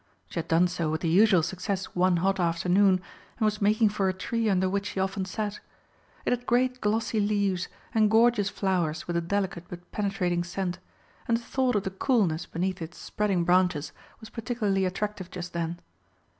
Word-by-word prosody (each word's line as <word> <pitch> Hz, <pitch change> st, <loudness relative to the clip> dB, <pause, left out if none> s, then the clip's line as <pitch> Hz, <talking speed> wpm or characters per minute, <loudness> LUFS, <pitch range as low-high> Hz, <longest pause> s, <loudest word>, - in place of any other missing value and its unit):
She -, -, -3 dB
had 165 Hz, -, -4 dB
done 170 Hz, +2 st, +4 dB
so 175 Hz, -3 st, -2 dB
with 160 Hz, +1 st, -2 dB
the 170 Hz, -, -1 dB
usual 190 Hz, 0 st, +5 dB
success 190 Hz, +2 st, -2 dB
one 180 Hz, 0 st, +3 dB
hot 195 Hz, 0 st, +2 dB
afternoon, 180 Hz, +2 st, +3 dB, 0.3 s
and 220 Hz, -, +1 dB
was 210 Hz, 0 st, 0 dB
making 215 Hz, +2 st, +4 dB
for 200 Hz, -2 st, 0 dB
a -, -, 0 dB
tree 225 Hz, +3 st, -1 dB
under 190 Hz, -1 st, +2 dB
which 200 Hz, +2 st, -1 dB
she 195 Hz, -, -4 dB
often 190 Hz, 0 st, -1 dB
sat. 210 Hz, +2 st, -4 dB, 0.7 s
It -, -, +1 dB
had 245 Hz, 0 st, -1 dB
great 250 Hz, +1 st, +2 dB
glossy 220 Hz, +1 st, 0 dB
leaves, 200 Hz, -3 st, +1 dB, 0.3 s
and 215 Hz, -2 st, +4 dB
gorgeous 225 Hz, -2 st, +4 dB
flowers 180 Hz, -6 st, -1 dB
with 175 Hz, -, -2 dB
a 170 Hz, -, +2 dB
delicate 190 Hz, 0 st, -2 dB
but 175 Hz, 0 st, -10 dB
penetrating 185 Hz, -4 st, 0 dB
scent, 175 Hz, 0 st, -3 dB, 0.5 s
and 230 Hz, -, +3 dB
the 235 Hz, -, -10 dB
thought 255 Hz, -1 st, 0 dB
of 205 Hz, -, +1 dB
the 190 Hz, -, -3 dB
coolness 190 Hz, -, +1 dB
beneath 185 Hz, +2 st, -2 dB
its 165 Hz, +1 st, -7 dB
spreading 195 Hz, -4 st, -1 dB
branches 180 Hz, -4 st, +2 dB, 0.3 s
was 220 Hz, -1 st, -12 dB
particularly 215 Hz, -5 st, -1 dB
attractive 185 Hz, 0 st, -3 dB
just 175 Hz, -1 st, -7 dB
then. 170 Hz, 0 st, -3 dB
190 Hz, 185 wpm, -27 LUFS, 175-210 Hz, 0.7 s, usual